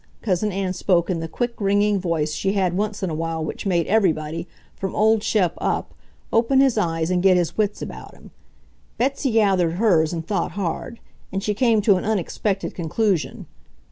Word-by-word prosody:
Cousin 210 0 0
Ann 190 -1 -2
spoke 180 -1 +1
in 170 - -1
the 165 - -4
quick, 240 +7 -3
ringing 205 0 +2
voice 165 -4 -1
she 195 +5 -1
had 185 -3 +1
once 205 +1 -2
in 185 - -1
a - - -3
while 160 0 -2
which 180 - -5
made 170 -4 +2
everybody, 165 -5 0 0.3
from 195 -1 -4
old 220 0 +3
Shep 200 -5 +1
up, - - -1 0.4
open 235 +4 +3
his 270 -3 +4
eyes 165 -4 0
and 180 -1 +2
get 185 -1 +5
his 175 -2 -1
wits 210 -1 -1
about - - -9
him. - - -16 0.7
Betsy 270 +2 0
gathered 195 -7 +2
hers 175 -6 +3
and 165 -2 -4
thought 175 -3 -2
hard; 200 +5 -4 0.3
and 195 0 -3
she 210 - 0
came 225 -1 +3
to 200 -3 +5
an - - -3
unexpected 200 -1 -1
conclusion. 180 +1 -1
195 Hz, 185 wpm, -22 LUFS, 170-215 Hz, 0.7 s, get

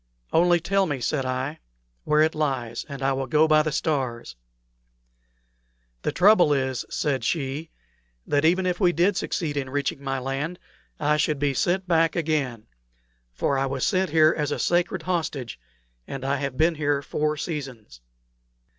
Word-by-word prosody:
"Only 175 +1 +4
tell 195 +3 +1
me," 145 -3 -2
said 130 +2 -1
I, 130 +5 -3 0.5
"where 150 0 +3
it 160 - +1
lies, 130 -6 -2
and 140 -2 -6
I 135 0 +2
will 135 0 -3
go 155 +4 +4
by 155 -1 +5
the 155 0 -2
stars." 130 - -2 1.7
"The - - -1
trouble 180 -5 +5
is," 130 -3 -1
said 140 -3 -1
she, 150 0 -2 0.6
"that 145 0 +1
even 180 +4 +3
if 180 -1 -1
we 180 -3 +3
did 180 +4 +2
succeed 155 -5 -2
in 135 -2 -2
reaching 140 0 -2
my 135 -1 -2
land, 135 +6 -3 0.4
I 150 +1 +2
should 150 0 +1
be 140 0 0
sent 180 +7 0
back 165 -1 +2
again; 145 -9 -1 0.7
for 135 - 0
I 135 - 0
was 135 -1 -2
sent 190 -2 +1
here 155 +1 +5
as 150 -2 -1
a - - -1
sacred 175 0 0
hostage, 155 - -3 0.5
and 135 -1 -6
I 140 +1 +1
have 140 -2 -4
been 165 +3 +3
here 145 -2 0
four 150 +1 -1
seasons." 130 - -6
150 Hz, 165 wpm, -25 LUFS, 135-165 Hz, 1.7 s, by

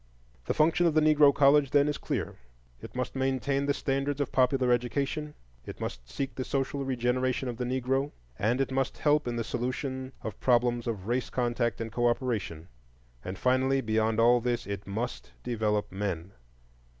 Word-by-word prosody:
The - - -1
function 165 +3 +3
of 160 - +1
the - - +6
Negro 150 -2 +6
college, 140 0 +4
then, 145 +1 +4
is 150 - -2
clear: - - -3 0.5
it - - -10
must 125 +1 -3
maintain 135 +1 0
the 140 - +3
standards 140 +1 -1
of 145 - -1
popular 130 -1 +3
education, 140 +5 -1 0.3
it - - -9
must - - -6
seek 135 -1 -3
the 130 - -3
social 135 +1 -2
regeneration 130 0 0
of 120 -2 -4
the 125 - -2
Negro, 130 +2 0 0.3
and 115 +5 +1
it 135 - 0
must 135 0 -1
help 150 -2 +2
in 120 - -2
the 115 - -1
solution 130 +2 -3
of 110 - -6
problems 120 -1 +2
of 105 -5 -3
race 120 +3 -1
contact 120 -3 -1
and 115 -1 -4
cooperation. 120 -8 -1 0.6
And 95 +1 -5
finally, 130 +3 +2
beyond 110 -2 +1
all 120 +1 +5
this, 120 0 -1
it 100 -1 -5
must 115 +5 -4
develop 105 -3 -1
men. 95 -2 -3
125 Hz, 175 wpm, -29 LUFS, 115-135 Hz, 0.6 s, the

